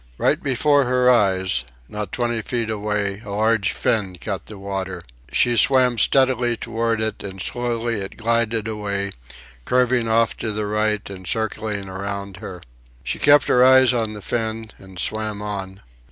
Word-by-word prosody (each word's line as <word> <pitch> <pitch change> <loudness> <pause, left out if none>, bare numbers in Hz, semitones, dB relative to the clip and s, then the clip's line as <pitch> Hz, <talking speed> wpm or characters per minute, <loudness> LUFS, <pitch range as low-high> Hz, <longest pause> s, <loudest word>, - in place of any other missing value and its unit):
Right - - +1
before 140 +1 +2
her 125 0 +3
eyes, 95 - +2 0.2
not 105 -1 -5
twenty 120 -2 -1
feet 115 +1 -2
away, 105 -1 -2
a - - -10
large 105 0 +1
fin 100 -5 -1
cut 95 +1 -5
the 105 - -9
water. 95 -2 -5 0.3
She 120 -1 +3
swam 125 -1 +4
steadily 125 -1 +3
toward 115 0 -1
it, 110 0 -2
and 95 -1 -8
slowly 120 +1 -2
it 95 - -7
glided 115 -1 0
away, 100 -2 -3 0.5
curving 125 - +2
off 115 0 +2
toward 110 -2 -4
the 105 0 -1
right 105 0 0
and 95 -2 -9
circling 110 -2 -2
around 100 0 -5
her. 90 -2 -9 0.4
She - - -3
kept 145 0 +5
her 125 - +4
eyes 130 -1 +6
on 110 -3 -1
the 105 -2 -9
fin 110 -1 -3
and 95 -1 -14
swam 110 +1 -2
on. 100 -2 -5
110 Hz, 160 wpm, -21 LUFS, 100-120 Hz, 0.5 s, eyes